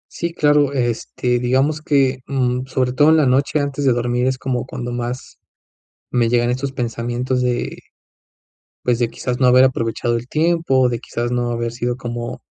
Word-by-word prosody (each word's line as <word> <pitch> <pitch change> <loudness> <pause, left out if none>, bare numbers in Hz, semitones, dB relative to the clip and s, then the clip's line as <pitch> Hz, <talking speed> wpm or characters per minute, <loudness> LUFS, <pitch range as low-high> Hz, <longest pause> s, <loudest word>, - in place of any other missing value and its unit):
Sí, 170 - -2
claro. 145 -3 +3
Este, 120 -1 -1
digamos 135 +5 +1
que, 135 -3 +2
mm, 130 -1 -1
sobre 130 -1 0
todo 145 +4 +5
en 160 - +5
la 155 - +4
noche 135 +4 +2
antes 140 0 -2
de 130 -3 +4
dormir, 120 +1 0
es 130 0 0
como 130 -1 -2
cuando 120 -2 -5
más 120 +1 -5 0.7
me 120 -2 +2
llegan 120 0 +2
estos 130 +2 -2
pensamientos 120 +1 -2
de, 125 -1 -1 1.0
pues, 125 -1 +1
de, 120 -1 0
quizás, 125 +1 -4
no 130 - +3
haber 125 +1 +6
aprovechado 120 -2 -1
el 120 +2 -7
tiempo. 155 -5 +2
De, 120 - -2
quizás, 120 +1 -4
no 120 -1 0
haber 115 0 -2
sido 120 0 -2
como, 120 -1 -5
125 Hz, 175 wpm, -19 LUFS, 120-135 Hz, 1.0 s, haber